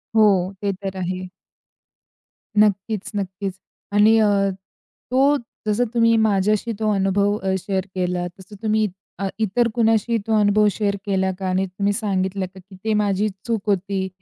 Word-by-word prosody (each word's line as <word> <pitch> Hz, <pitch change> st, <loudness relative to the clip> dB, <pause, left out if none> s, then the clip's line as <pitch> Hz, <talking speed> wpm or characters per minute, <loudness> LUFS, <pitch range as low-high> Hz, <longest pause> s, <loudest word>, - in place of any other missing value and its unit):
हो. 200 Hz, -4 st, +4 dB
ते 200 Hz, -1 st, 0 dB
तर 190 Hz, -1 st, -4 dB
आहे. 185 Hz, 0 st, -3 dB, 1.3 s
नक्कीच, 210 Hz, 0 st, +1 dB
नक्कीच.आणि 200 Hz, +2 st, 0 dB
अ, 200 Hz, -2 st, +3 dB, 0.6 s
तो 275 Hz, +3 st, +4 dB, 0.3 s
जसं 225 Hz, +4 st, +2 dB
तुम्ही 230 Hz, -1 st, +4 dB
माझ्याशी 215 Hz, +1 st, +2 dB
तो 215 Hz, -, +1 dB
अनुभव 200 Hz, +1 st, +2 dB
अ, 190 Hz, -1 st, -1 dB
शेअर 190 Hz, 0 st, -2 dB
केलात, 180 Hz, -1 st, -1 dB
तसं 190 Hz, +2 st, -12 dB
तुम्ही 215 Hz, -1 st, +2 dB, 0.3 s
अ, 195 Hz, -, -1 dB
इतर 225 Hz, +3 st, +2 dB
कुणाशी 225 Hz, 0 st, +2 dB
तो 220 Hz, -1 st, +3 dB
अनुभव 210 Hz, 0 st, +4 dB
शेअर 200 Hz, -1 st, -1 dB
केला 190 Hz, -1 st, +1 dB
का? 190 Hz, -, -3 dB
आणि 185 Hz, +1 st, +1 dB
तुम्ही 200 Hz, +2 st, -1 dB
सांगितलं 190 Hz, -3 st, -1 dB
का 190 Hz, -, -12 dB
की 190 Hz, +1 st, -15 dB
ते 220 Hz, -1 st, +1 dB
माझी 205 Hz, 0 st, +1 dB, 0.2 s
चूक 220 Hz, -2 st, -1 dB
होती 195 Hz, 0 st, 0 dB
200 Hz, 150 wpm, -22 LUFS, 190-215 Hz, 1.3 s, हो